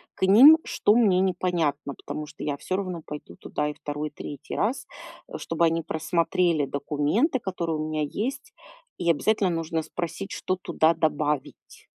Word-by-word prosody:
к -, -, -21 dB
ним, 260 Hz, +12 st, +9 dB
что 210 Hz, -, +2 dB
мне 205 Hz, -6 st, +4 dB
непонятно. 175 Hz, -6 st, 0 dB
Потому 150 Hz, 0 st, -6 dB
что -, -, -10 dB
я 145 Hz, -1 st, -1 dB
всё 185 Hz, -, -3 dB
равно 185 Hz, -4 st, -4 dB
пойду 150 Hz, 0 st, -9 dB
туда 150 Hz, -, -3 dB
и 150 Hz, -, -4 dB
2, 150 Hz, +1 st, -5 dB
и -, -, -34 dB
3 145 Hz, -1 st, -8 dB
раз, 235 Hz, +6 st, -1 dB, 0.4 s
э, -, -, -7 dB
чтобы 165 Hz, +1 st, 0 dB
они 165 Hz, 0 st, +1 dB
просмотрели 165 Hz, 0 st, 0 dB
документы, 150 Hz, -, 0 dB
которые 170 Hz, -6 st, -3 dB
у 155 Hz, -, -3 dB
меня 155 Hz, -1 st, -1 dB
есть. 260 Hz, -, -4 dB, 0.4 s
И 170 Hz, -1 st, -1 dB
обязательно 195 Hz, +4 st, +1 dB
нужно 165 Hz, -1 st, -2 dB
спросить, 175 Hz, +4 st, -5 dB
что 185 Hz, -, -2 dB
туда 170 Hz, -3 st, +2 dB
добавить. 150 Hz, -3 st, -2 dB
165 Hz, 165 wpm, -25 LUFS, 150-190 Hz, 0.4 s, ним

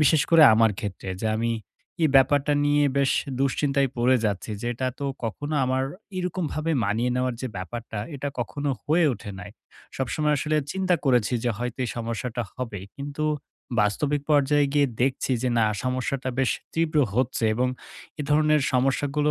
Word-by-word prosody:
বিশেষ 150 Hz, 0 st, +4 dB
করে 165 Hz, -1 st, +7 dB
আমার 115 Hz, 0 st, +4 dB
ক্ষেত্রে, 100 Hz, -3 st, -5 dB
যে 110 Hz, -, +1 dB
আমি 115 Hz, +1 st, 0 dB, 0.5 s
এই 160 Hz, -, +5 dB
ব্যাপারটা 145 Hz, +2 st, +4 dB
নিয়ে 145 Hz, 0 st, +3 dB
বেশ 135 Hz, -1 st, +3 dB, 0.3 s
দুশ্চিন্তায় 140 Hz, 0 st, +1 dB
পড়ে 125 Hz, +2 st, +4 dB
যাচ্ছি। 105 Hz, 0 st, -2 dB
যে 120 Hz, -, -4 dB
এটা 130 Hz, +2 st, -1 dB
তো 140 Hz, -, -4 dB, 0.2 s
কখনো 145 Hz, +7 st, -3 dB
আমার 130 Hz, +1 st, +1 dB, 0.3 s
এরকমভাবে 165 Hz, -3 st, -2 dB
মানিয়ে 110 Hz, +5 st, 0 dB
নেওয়ার 125 Hz, -1 st, 0 dB
যে 130 Hz, -, -2 dB
ব্যাপারটা, 110 Hz, +4 st, -6 dB, 0.2 s
এটা 145 Hz, +1 st, -3 dB
কখনো 145 Hz, +4 st, -2 dB
হয়ে 165 Hz, +3 st, +3 dB
ওঠে 105 Hz, -1 st, -9 dB
নাই। 100 Hz, -, -9 dB, 0.5 s
সবসময় 150 Hz, +3 st, 0 dB
আসলে 155 Hz, +3 st, 0 dB, 0.2 s
চিন্তা 190 Hz, -1 st, +1 dB
করেছি 125 Hz, -3 st, +2 dB
যে, 120 Hz, -, +2 dB
হয়তো 125 Hz, 0 st, -4 dB
এই 120 Hz, -, -3 dB
সমস্যাটা 115 Hz, +1 st, -3 dB
হবে। 115 Hz, -6 st, -5 dB, 0.2 s
কিন্তু 145 Hz, +2 st, -4 dB, 0.6 s
বাস্তবিক 140 Hz, +8 st, +1 dB
পর্যায়ে 145 Hz, 0 st, +4 dB
গিয়ে 145 Hz, -1 st, +4 dB, 0.2 s
দেখছি 130 Hz, 0 st, 0 dB
যে 130 Hz, -, +1 dB
না 110 Hz, -, +4 dB, 0.2 s
সমস্যাটা 130 Hz, +1 st, -1 dB
বেশ 135 Hz, -2 st, +2 dB, 0.2 s
তীব্র 165 Hz, -2 st, +1 dB, 0.2 s
হচ্ছে 120 Hz, -1 st, 0 dB
এবং 125 Hz, +3 st, +1 dB, 0.5 s
এ -, -, -1 dB
ধরনের 150 Hz, 0 st, +4 dB
সমস্যাগুলো 140 Hz, +3 st, +1 dB
135 Hz, 160 wpm, -25 LUFS, 120-150 Hz, 0.6 s, করে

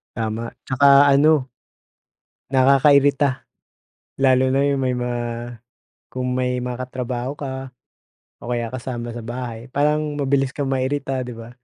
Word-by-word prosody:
Tama, 115 Hz, 0 st, -3 dB
tsaka 140 Hz, +1 st, +6 dB
ano 145 Hz, -1 st, +4 dB, 1.0 s
nakakairita 140 Hz, 0 st, +4 dB, 0.8 s
lalo 130 Hz, 0 st, +4 dB
na 135 Hz, -, +3 dB
'yung 140 Hz, -1 st, +1 dB
may 130 Hz, -1 st, 0 dB
ma 125 Hz, 0 st, -2 dB, 1.0 s
kung 125 Hz, 0 st, -3 dB
may 125 Hz, 0 st, -1 dB
makatrabaho 125 Hz, 0 st, -4 dB
ka 130 Hz, -1 st, -6 dB, 0.7 s
o -, -, -11 dB
kaya 120 Hz, -2 st, -2 dB
kasama 120 Hz, -2 st, -5 dB
sa 120 Hz, -, -7 dB
bahay 120 Hz, 0 st, -6 dB
parang 150 Hz, +2 st, 0 dB
mabilis 135 Hz, -2 st, 0 dB
kang 140 Hz, -2 st, -2 dB
mairita, 135 Hz, -1 st, -1 dB
di 125 Hz, -, -7 dB
ba? 115 Hz, 0 st, -10 dB
130 Hz, 125 wpm, -21 LUFS, 125-140 Hz, 1.0 s, tsaka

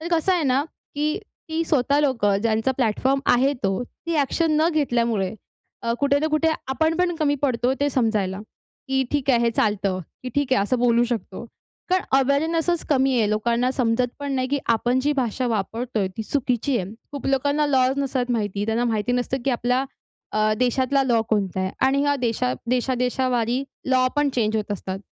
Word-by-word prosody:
तर 330 Hz, -, -5 dB
कसं 335 Hz, +3 st, +2 dB
आहे 350 Hz, -4 st, +1 dB
ना, 270 Hz, +1 st, +2 dB, 0.3 s
की 300 Hz, +1 st, 0 dB, 0.3 s
ती 320 Hz, +1 st, -1 dB
स्वतः 285 Hz, -2 st, +2 dB
लोकं 230 Hz, -9 st, +2 dB
ज्यांचा 225 Hz, +3 st, +1 dB
प्लॅटफॉर्म 260 Hz, +2 st, +1 dB
आहे 265 Hz, +3 st, +3 dB
तो. 195 Hz, -3 st, -1 dB, 0.2 s
ती 335 Hz, -, -1 dB
ॲक्शन 305 Hz, +3 st, +1 dB
न 325 Hz, -, +4 dB
घेतल्यामुळे 235 Hz, -, 0 dB, 0.5 s
अ, 230 Hz, -, 0 dB
कुठे 280 Hz, 0 st, +3 dB
ना 310 Hz, -, 0 dB
कुठे 315 Hz, +1 st, +3 dB, 0.2 s
आपण 315 Hz, +5 st, +1 dB
पण 360 Hz, 0 st, +1 dB
कमी 300 Hz, -3 st, +1 dB
पडतो, 250 Hz, -1 st, +1 dB
ते 285 Hz, -, +2 dB
समजायला. 210 Hz, -7 st, 0 dB, 0.5 s
की 265 Hz, 0 st, +2 dB
"ठीक 285 Hz, -2 st, -1 dB
आहे, 245 Hz, -, +4 dB
हे 235 Hz, 0 st, +2 dB
चालतं," 205 Hz, -4 st, 0 dB, 0.2 s
की 255 Hz, -, -4 dB
"ठीक 285 Hz, -2 st, 0 dB
आहे, 200 Hz, -, +4 dB
असं 250 Hz, +5 st, 0 dB
बोलू 240 Hz, 0 st, +3 dB
शकतो." 225 Hz, -2 st, -4 dB, 0.5 s
कारण 370 Hz, 0 st, +3 dB, 0.2 s
अवेअरनेसच 320 Hz, +5 st, +1 dB
कमी 270 Hz, -2 st, +3 dB
आहे. 215 Hz, -2 st, +2 dB
लोकांना 235 Hz, +4 st, +1 dB
समजत 245 Hz, -1 st, +1 dB
पण 285 Hz, -1 st, -3 dB
नाही 255 Hz, -1 st, -1 dB
की 285 Hz, -, 0 dB, 0.2 s
आपण 245 Hz, +3 st, +1 dB
जी 290 Hz, +3 st, +1 dB
भाषा 250 Hz, +1 st, -1 dB
वापरतोय, 225 Hz, -1 st, -2 dB
ती 220 Hz, -, -3 dB
चुकीची 250 Hz, +1 st, 0 dB
आहे. 185 Hz, 0 st, -4 dB, 0.2 s
खूप 285 Hz, -, -5 dB
लोकांना 285 Hz, +2 st, +1 dB
लॉज 265 Hz, -1 st, +2 dB
नसतात 260 Hz, -2 st, -1 dB
माहिती. 205 Hz, -3 st, -1 dB
त्यांना 225 Hz, +2 st, 0 dB
माहिती 215 Hz, +3 st, -1 dB
नसतं 250 Hz, +1 st, -1 dB
की 275 Hz, -, +2 dB
आपला 250 Hz, +2 st, +1 dB, 0.5 s
अ, 215 Hz, 0 st, +2 dB
देशातला 260 Hz, +2 st, +2 dB
लॉ 240 Hz, -3 st, +2 dB
कोणता 195 Hz, -4 st, 0 dB
आहे. 190 Hz, -, -1 dB, 0.2 s
आणि 275 Hz, +1 st, +2 dB
ह्या 285 Hz, 0 st, +2 dB
देशात 225 Hz, -, -1 dB
देशादेशावारी 250 Hz, 0 st, 0 dB, 0.3 s
लॉ 255 Hz, -1 st, +3 dB
पण 290 Hz, 0 st, +3 dB
चेंज 220 Hz, -2 st, +1 dB
होत 210 Hz, -1 st, -2 dB
असतात. 190 Hz, 0 st, -5 dB
255 Hz, 185 wpm, -23 LUFS, 225-280 Hz, 0.5 s, न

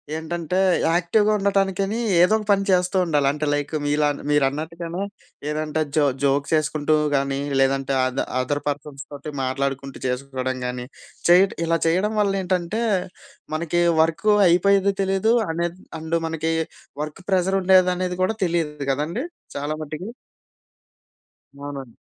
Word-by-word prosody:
ఏంటంటే, 170 Hz, +2 st, -2 dB, 0.3 s
యాక్టివ్‌గా 205 Hz, +5 st, +2 dB
ఉండటానికని 195 Hz, +2 st, 0 dB, 0.2 s
ఏదో 185 Hz, +5 st, +5 dB
ఒక 210 Hz, -, -6 dB
పని 195 Hz, 0 st, +3 dB
చేస్తూ 180 Hz, 0 st, +2 dB
ఉండాలి. 145 Hz, -4 st, +2 dB
అంటే, 150 Hz, +1 st, -3 dB
లైక్ 145 Hz, +1 st, -2 dB
మీలా 150 Hz, 0 st, +2 dB, 0.2 s
మీరన్నట్టుగానే 160 Hz, +6 st, -1 dB, 0.5 s
ఏదంటే 155 Hz, +1 st, -1 dB
జో 150 Hz, -, +4 dB, 0.2 s
జోక్ 140 Hz, +1 st, +2 dB
ఏసుకుంటూ 155 Hz, 0 st, 0 dB, 0.2 s
గానీ, 135 Hz, 0 st, 0 dB, 0.2 s
లేదంటే, 135 Hz, 0 st, +1 dB
అ -, -, +2 dB, 0.3 s
అదర్ 145 Hz, +3 st, -1 dB
పర్సన్స్ 145 Hz, -1 st, -4 dB
తోటి 145 Hz, +1 st, -7 dB
మాట్లాడుకుంటూ 135 Hz, +1 st, -3 dB
చేసుకోవడం 130 Hz, 0 st, -3 dB
గానీ, 125 Hz, 0 st, -4 dB, 0.4 s
చేయ 180 Hz, +2 st, +8 dB, 0.2 s
ఇలా 165 Hz, 0 st, +2 dB
చేయడం 190 Hz, +6 st, +1 dB
వల్ల 200 Hz, -1 st, +2 dB
ఏంటంటే, 185 Hz, +4 st, -1 dB, 0.7 s
మనకి 170 Hz, +2 st, 0 dB, 0.2 s
వర్క్ 165 Hz, +6 st, 0 dB, 0.2 s
అయిపోయేది 200 Hz, +3 st, +4 dB
తెలియదు. 195 Hz, +4 st, +2 dB, 0.2 s
అనేది 170 Hz, +2 st, -3 dB, 0.2 s
అండు 160 Hz, +1 st, -1 dB
మనకి 160 Hz, 0 st, -2 dB, 0.5 s
వర్క్ 155 Hz, +5 st, -8 dB
ప్రెషరుండేది 185 Hz, 0 st, +4 dB
అనేది 180 Hz, 0 st, -2 dB
కూడా 220 Hz, +4 st, +1 dB
తెలీదు 165 Hz, -3 st, -1 dB, 0.2 s
కదండీ. 165 Hz, -, -2 dB, 0.3 s
చాలా 145 Hz, +2 st, -2 dB
మటికి. 155 Hz, +8 st, -6 dB, 1.5 s
అవునండి. 140 Hz, -4 st, -7 dB
160 Hz, 125 wpm, -23 LUFS, 145-185 Hz, 1.5 s, చేయ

